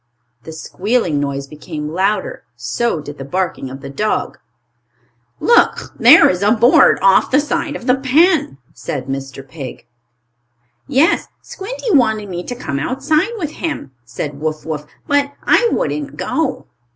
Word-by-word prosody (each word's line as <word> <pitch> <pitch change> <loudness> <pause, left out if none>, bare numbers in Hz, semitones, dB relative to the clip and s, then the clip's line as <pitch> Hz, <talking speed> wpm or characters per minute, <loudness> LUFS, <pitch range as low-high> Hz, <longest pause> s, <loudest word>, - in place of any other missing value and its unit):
The 160 - -7
squealing 180 0 -1
noise 140 -1 -3
became 150 +1 -7
louder. 195 +4 -1
So 235 -10 -2
did 145 0 -10
the - - -5
barking 180 -2 -3
of 135 +1 -9
the 135 - -8
dog. 215 +9 -2 1.0
"Look, 470 - +2
there 260 +8 +8
is 180 0 0
a 205 - +3
board 235 +3 +5
off 195 0 +5
the 275 - +4
side 300 0 -2
of 240 - -7
the 250 - +4
pen," 275 - +2 0.2
said 130 - -5
Mr. 135 0 -6
Pig. 135 -4 -9 1.0
"Yes, 290 +6 +2 0.2
Squinty 465 +4 -5
wanted 220 -5 +2
me 175 -1 -4
to 245 - -5
come 140 - -4
outside 305 - 0
with 310 -7 -3
him," 310 - -5
said 140 +4 -6
Wuff 155 0 -3
Wuff. 150 -2 -5 0.2
"But 285 -1 +1
I 475 - +4
wouldn't 295 -2 -2
go." 320 0 -2
205 Hz, 150 wpm, -17 LUFS, -, 1.0 s, there